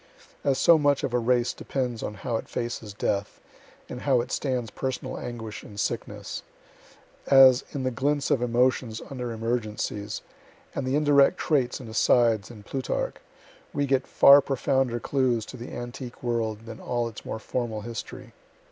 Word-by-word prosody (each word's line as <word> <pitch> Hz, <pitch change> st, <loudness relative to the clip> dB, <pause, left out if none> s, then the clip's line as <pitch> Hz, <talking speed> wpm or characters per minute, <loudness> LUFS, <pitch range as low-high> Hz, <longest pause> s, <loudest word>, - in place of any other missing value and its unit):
(As 140 Hz, -2 st, +2 dB
so 170 Hz, -2 st, +6 dB
much 145 Hz, -2 st, +2 dB
of 125 Hz, -, -2 dB
a 125 Hz, -, +3 dB
race 120 Hz, 0 st, +2 dB
depends 125 Hz, -4 st, -3 dB
on 105 Hz, -, -4 dB
how 115 Hz, +3 st, -3 dB
it -, -, -8 dB
faces 120 Hz, -3 st, -4 dB
death, 100 Hz, 0 st, -2 dB, 0.5 s
and 125 Hz, -, -7 dB
how 135 Hz, -3 st, +3 dB
it 120 Hz, +2 st, -3 dB
stands 125 Hz, -6 st, -1 dB
personal 130 Hz, +1 st, -4 dB
anguish 115 Hz, -3 st, -6 dB
and 105 Hz, -1 st, -10 dB
sickness. -, -, -3 dB, 0.9 s
As, 135 Hz, -1 st, +7 dB
in 140 Hz, -, -3 dB
the 130 Hz, -, 0 dB
glints 140 Hz, +3 st, 0 dB
of 125 Hz, -, +3 dB
emotions 125 Hz, -1 st, +1 dB
under 125 Hz, -3 st, -4 dB
emergencies, 110 Hz, -2 st, -3 dB, 0.5 s
and 135 Hz, -, -3 dB
the 130 Hz, -, +1 dB
indirect 145 Hz, +2 st, +4 dB
traits 135 Hz, -6 st, +1 dB
and 125 Hz, -, -9 dB
asides 110 Hz, -1 st, +3 dB
in 110 Hz, -4 st, -11 dB
Plutarch, 130 Hz, +4 st, -3 dB, 0.6 s
we 145 Hz, -, +1 dB
get 135 Hz, -1 st, +1 dB
far 140 Hz, +1 st, +8 dB
profounder 130 Hz, -2 st, 0 dB
clues 125 Hz, -4 st, 0 dB
to -, -, -9 dB
the 120 Hz, 0 st, -8 dB
antique 120 Hz, +1 st, -7 dB
world 115 Hz, -2 st, -1 dB
than 115 Hz, -1 st, -8 dB
all 120 Hz, -1 st, -1 dB
its 115 Hz, -, -9 dB
more -, -, -4 dB
formal 110 Hz, -1 st, -3 dB
history.) 120 Hz, +2 st, -7 dB
125 Hz, 165 wpm, -26 LUFS, 115-130 Hz, 0.9 s, far